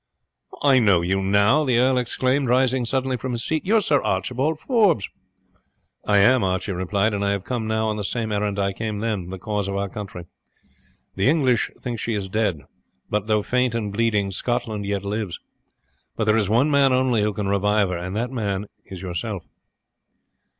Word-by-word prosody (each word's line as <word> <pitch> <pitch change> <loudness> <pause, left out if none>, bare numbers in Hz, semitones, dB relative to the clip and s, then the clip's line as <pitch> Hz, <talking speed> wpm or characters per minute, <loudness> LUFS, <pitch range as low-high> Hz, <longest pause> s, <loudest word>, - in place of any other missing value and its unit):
"I 135 -3 +5
know 100 -7 +4
you 95 +3 0
now!" 100 +9 +3
the 130 -5 +2
earl 130 +1 +3
exclaimed, 130 +2 0
rising 130 0 +2
suddenly 130 +1 -1
from 130 +1 -4
his 115 - -2
seat. 155 -1 -1
"You 220 - +3
are - - +6
Sir 145 -7 +2
Archibald 130 +11 -1
Forbes?" 205 - +2 1.0
"I 105 - +4
am," 120 +4 +5
Archie 95 +2 -1
replied, 100 +4 0
"and 100 0 -1
I 100 - +1
have 100 -2 -1
come 120 -2 -3
now 110 0 0
on 105 -1 -1
the 105 - -3
same 110 +2 -2
errand 105 -1 -1
I 100 -1 0
came 110 +1 -4
then 105 -5 -3
the 95 - -6
cause 105 0 -3
of 100 - -3
our 100 0 -1
country. 95 -4 -7 0.9
The 95 +6 +3
English 135 -6 +2
think 120 -3 -4
she 115 +1 -2
is 100 -2 -4
dead, 100 -7 0 0.5
but, 105 0 -1
though 105 -1 +2
faint 125 0 0
and 105 -3 -3
bleeding, 105 -3 +1
Scotland 110 -1 -2
yet 100 -1 -2
lives; 100 -4 -3 0.8
but 110 - -1
there 110 0 +3
is 105 -3 +1
one 125 +8 +3
man 140 -2 +4
only 130 -3 +2
who 105 +1 +1
can 100 -1 -3
revive 100 0 +2
her, 90 - -2
and 90 +3 -5
that 120 +3 -2
man 105 -5 -2 0.2
is 95 -1 -9
yourself." 85 -3 -4
110 Hz, 195 wpm, -23 LUFS, 100-125 Hz, 1.0 s, are